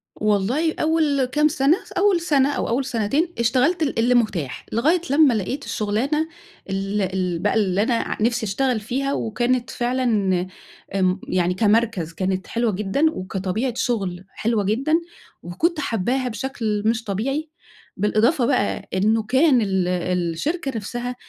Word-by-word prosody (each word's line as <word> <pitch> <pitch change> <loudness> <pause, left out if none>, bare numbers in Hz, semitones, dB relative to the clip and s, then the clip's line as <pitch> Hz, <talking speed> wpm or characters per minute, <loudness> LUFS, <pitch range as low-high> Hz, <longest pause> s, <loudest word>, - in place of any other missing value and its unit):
والله 215 +10 +1
أول 310 -4 +2
كام 300 +4 +2
سنة، 295 +3 +2
س - - -17
أول 380 -3 +2
سنة 285 -5 +2
أو - - -2
أول 255 +3 0
سنتين 270 +8 0
اشتغلت 265 +8 +2
ال 275 -6 -1
اللي 245 +2 +3
متاح، 185 - -1
لغاية 315 +10 +2
لمّا 285 -2 +5
لقيت 230 +7 -3
الشغلانة 265 +10 -1 0.4
ال 195 +2 -1
ال 185 -2 -1
بقى 205 - +1
اللي 200 -2 +2
أنا 235 - +1
ع 230 - -1
نِفْسي 235 0 +1
اشتغل 245 +4 0
فيها، 270 +6 -2
وكانت 240 +2 -1
فعلًا 220 -8 0 0.5
آمم، 185 0 +1
يعني 180 0 +1
كمركز 210 -5 +1
كانت 190 +1 -2
حلوة 235 -1 0
جدًا، 210 +9 0
وكطبيعة 195 +4 -3
شغل 195 -8 -2
حلوة 220 0 -1
جدًا، 250 +10 0 0.5
وكُنت 310 - -1
حابّاها 250 +1 -1
بشكل 225 -3 -3
مش 225 +1 +1
طبيعي، 270 +10 -2 0.5
بالإضافة 230 - +2
بقى 205 - 0
إنه 215 +4 +2
كان 260 +3 +3
ال 190 -3 0
الشركة 180 - -1
نَفْسها 240 +3 -4
230 Hz, 145 wpm, -22 LUFS, 195-270 Hz, 0.5 s, لمّا